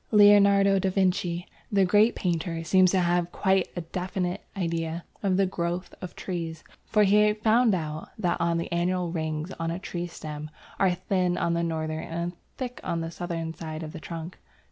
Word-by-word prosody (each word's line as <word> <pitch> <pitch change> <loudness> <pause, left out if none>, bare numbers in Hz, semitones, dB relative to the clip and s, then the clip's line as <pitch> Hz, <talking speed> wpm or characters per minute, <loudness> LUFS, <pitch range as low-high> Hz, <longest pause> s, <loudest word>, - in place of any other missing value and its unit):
Leonardo 200 -2 +6
da 190 - +1
Vinci, 180 -2 0 0.3
the 195 -2 +4
great 210 +5 +4
painter, 165 -2 -1
seems 185 +2 +5
to 190 - +2
have 175 0 +2
had 175 - -21
quite 190 -2 +2
a 175 - -2
definite 180 +2 -3 0.2
idea 165 -2 -2 0.2
of 190 -2 +1
the 195 - +4
growth 175 0 -3
of 180 - -7
trees, 165 -3 -5 0.2
for 210 -1 +4
he 210 +1 +5
found 220 0 +3
out 155 -2 -4
that 180 -5 0 0.2
the 170 - -3
annual 175 0 0
rings 160 0 -3
on 165 0 -1
a 165 - -2
tree 175 -2 -4
stem 150 -2 -7 0.3
are 185 -2 +3
thin 185 -1 0
on 170 - +1
the 170 - +1
northern 160 -1 -2
and 170 +1 -3 0.2
thick 250 -2 -5
on 165 -1 -1
the 165 0 -4
southern 165 -2 -4
side 160 -1 -6
of 155 0 -7
the 165 - -6
trunk. 165 +2 -7
175 Hz, 185 wpm, -27 LUFS, 165-190 Hz, 0.3 s, Leonardo